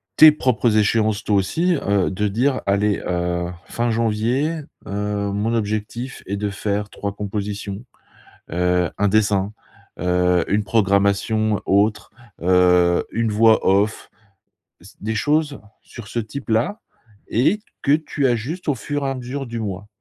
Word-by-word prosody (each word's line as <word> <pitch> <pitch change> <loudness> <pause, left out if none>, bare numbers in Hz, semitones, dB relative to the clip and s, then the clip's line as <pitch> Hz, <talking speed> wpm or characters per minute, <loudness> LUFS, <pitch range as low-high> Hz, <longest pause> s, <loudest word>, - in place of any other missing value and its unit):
tes 155 0 +9
propres 125 -6 +1
échéances, 110 0 +2
toi, 105 - +1
aussi. 165 - +1
Heu, 100 - +1
de 105 +3 -1
dire: 125 +6 0
«Allez, 100 +1 +1
heu, 90 0 -1 0.2
fin 120 0 -1
janvier, 115 +8 0 0.3
heu, 100 0 -2
mon 105 +3 -1
objectif 110 +3 -3
est 100 +1 -3
de 105 0 -2
faire 100 +1 -2
3 100 -1 -5
compositions, 100 +1 -4 0.7
heu, 90 0 +1
1 100 - +3
dessin, 105 -1 +2 0.5
heu, 90 0 +2
1 105 +1 +1
programmation 100 +1 +1
autre, 105 +2 +1 0.3
heu, 90 -1 +4
1 115 0 0
voix 110 +1 +4
off». 100 +3 +1 0.7
C - - -16
des 110 +2 -3
choses 145 +4 0 0.2
sur 115 -3 -11
ce 120 - -2
type-là 115 - -2 0.5
et 155 - +2 0.2
que 140 - +4
tu 150 -2 0
ajustes 130 +10 -2
au 145 - +2
fur 145 +3 -3
et - - 0
à - - -3
mesure 130 +2 -5
du 115 -1 -5
mois. 100 0 -5
105 Hz, 145 wpm, -21 LUFS, 100-120 Hz, 0.7 s, tes